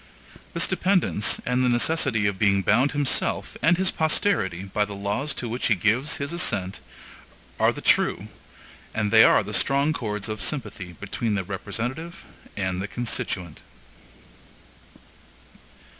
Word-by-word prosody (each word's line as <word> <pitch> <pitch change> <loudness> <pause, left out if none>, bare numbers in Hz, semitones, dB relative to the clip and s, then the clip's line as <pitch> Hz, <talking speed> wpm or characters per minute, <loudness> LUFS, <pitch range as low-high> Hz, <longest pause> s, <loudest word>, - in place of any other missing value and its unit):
This - - +3
dependence, 180 - +1
and 125 +1 +1
the 125 - +3
necessity 120 -3 +2
of 100 -2 -1
being 100 -2 +3
bound 125 +9 +3
himself, 145 -2 0
and 170 +2 +4
his 190 0 +2
posterity, 155 - 0
by 100 +2 -1
the 105 -1 -6
laws 105 +9 -2
to 120 - -4
which 120 +3 -2
he 110 - +3
gives 115 - +1
his 140 +2 -4
assent, 100 - -1 0.8
are - - +4
the - - -8
true, - - +2 0.7
and 105 -2 0
they 110 0 +8
are - - +5
the 105 +1 -7
strong 140 +6 +2
chords 105 -7 -3
of 110 -1 -5
sympathy 105 -10 -4
between 105 +4 -3
the 95 - -1
representative 120 - -5 0.3
and 95 -2 -2
the 100 - -3
constituent. 100 -7 -4
110 Hz, 145 wpm, -24 LUFS, 100-140 Hz, 0.8 s, they